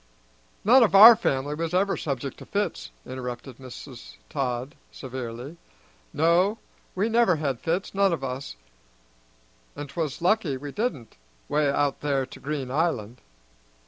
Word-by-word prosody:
"None 250 +5 +7
of 215 -4 +4
our 225 +4 +11
family 140 -9 -1
was 165 +3 -3
ever 195 +2 +2
subject 140 -2 -4
to - - -10
fits," - - -2 0.2
interrupted 125 0 -7
Mrs. 110 - -11 0.2
Todd 125 +1 -2 0.2
severely. 130 +3 -7 0.5
"No, 175 +7 +2 0.4
we 195 +4 +1
never 230 -5 +3
had 140 -5 -2
fits, 175 +4 -2
none 195 -1 +3
of 165 -5 -2
us; 130 - -5 1.2
and 145 - -6
'twas 155 -1 -4
lucky 175 -6 +1
we 145 +2 -7
didn't 175 - -4 0.3
'way 145 0 +1
out 140 0 0
there 140 -2 0
to 130 - -13
Green 140 -3 -4
Island. 125 -7 -1
145 Hz, 140 wpm, -25 LUFS, 130-180 Hz, 1.2 s, our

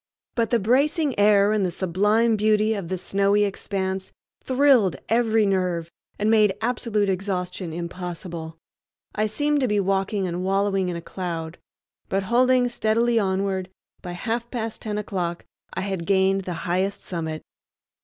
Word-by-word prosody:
But 230 -2 0
the 240 - +3
bracing 275 - +2
air 205 0 +5
and 210 -2 +1
the 185 - +1
sublime 210 +6 +2
beauty 215 +1 +2
of 200 -5 -4
the 185 +2 -2
snowy 200 +3 +2
expanse 190 -1 -3 0.3
thrilled 260 - +4
every 225 -2 +3
nerve 180 -4 0 0.3
and 210 - 0
made 215 -3 +4
absolute 225 -3 0
exhaustion 185 -2 -2
impossible. 170 -1 -6 0.6
I 215 +1 0
seemed 290 +7 0
to 260 - +1
be 210 -2 +1
walking 195 +1 0
and 180 0 -3
wallowing 195 -1 +1
in 175 - -3
a 170 - -6
cloud; 170 -3 -5 0.5
but, 195 0 0
holding 250 +3 +3
steadily 235 0 +1
onward, 190 -1 -1 0.3
by 180 - -6
half 235 +5 -3
past 225 -3 -4
ten 210 -1 -3
o'clock 180 -5 -3 0.3
I - - -1
had 190 -3 -3
gained 195 0 +2
the 180 - -3
highest 190 +3 0
summit. 160 -3 -4
200 Hz, 150 wpm, -24 LUFS, 185-220 Hz, 0.6 s, air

